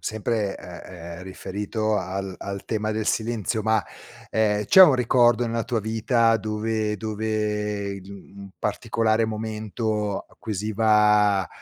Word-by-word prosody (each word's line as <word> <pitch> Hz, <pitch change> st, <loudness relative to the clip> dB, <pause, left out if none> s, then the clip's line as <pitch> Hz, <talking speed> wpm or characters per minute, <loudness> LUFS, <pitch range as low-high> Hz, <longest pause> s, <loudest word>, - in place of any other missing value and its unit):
sempre, 110 Hz, -1 st, -2 dB
ehm, 85 Hz, -1 st, -10 dB
ehm, -, -, -9 dB
riferito 105 Hz, +3 st, -3 dB
al 95 Hz, +1 st, -4 dB
al 100 Hz, -1 st, -6 dB
tema 110 Hz, -1 st, -2 dB
del 110 Hz, 0 st, -2 dB
silenzio, 110 Hz, -1 st, -1 dB
ma, 110 Hz, 0 st, +2 dB, 0.5 s
ehm, 105 Hz, -1 st, +1 dB
c'è 190 Hz, -, +8 dB
un 150 Hz, -7 st, +8 dB
ricordo 120 Hz, -1 st, +3 dB
nella 115 Hz, 0 st, -1 dB
tua 120 Hz, -, -1 dB
vita 115 Hz, +1 st, +2 dB
dove 110 Hz, 0 st, -2 dB
dove 105 Hz, -1 st, -2 dB
in 95 Hz, -, -13 dB, 0.3 s
un 100 Hz, 0 st, -9 dB
particolare 115 Hz, -1 st, 0 dB
momento 110 Hz, -1 st, -2 dB
acquisiva 105 Hz, -2 st, +2 dB
110 Hz, 125 wpm, -24 LUFS, 105-110 Hz, 0.5 s, c'è